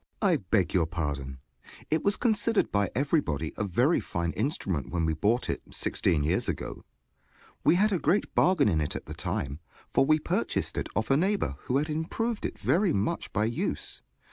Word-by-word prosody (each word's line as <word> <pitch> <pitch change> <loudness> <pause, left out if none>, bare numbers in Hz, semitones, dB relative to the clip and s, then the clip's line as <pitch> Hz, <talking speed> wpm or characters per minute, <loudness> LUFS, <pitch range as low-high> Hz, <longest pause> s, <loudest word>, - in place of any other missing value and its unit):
JOHN 205 - +3
S. - - +4
I - - -20
beg 95 -6 +2
your 85 -4 +3
pardon: 70 -5 -3 0.5
it 155 - +1
was 200 +1 +2
considered 225 -2 +1
by 100 -1 +2
everybody 125 - 0
a - - -2
very 120 - +2
fine 85 -1 -2
instrument 100 - -2
when 85 -2 0
we 80 - +1
bought 105 +10 +1
it, - - -2
sixteen 75 -3 0
years 85 +5 +1
ago. - - -4 0.8
We - - +5
had 210 +4 +3
a 185 - +1
great 175 +8 +1
bargain 180 - +4
in 80 -6 +2
it 75 - -2
at - - -5
the - - -7
time, 70 +2 -3 0.3
for - - +4
we 155 +3 +4
purchased 155 - -1
it - - -3
of 110 +6 0
a 135 - +5
neighbor 190 - +1
who 130 - +1
had 150 +2 0
improved 190 +9 -2
it - - -10
very 185 +1 +2
much 100 +2 -1
by 105 +1 +1
use. 115 +1 -2
Mr. - - -46
115 Hz, 200 wpm, -28 LUFS, -, 0.8 s, We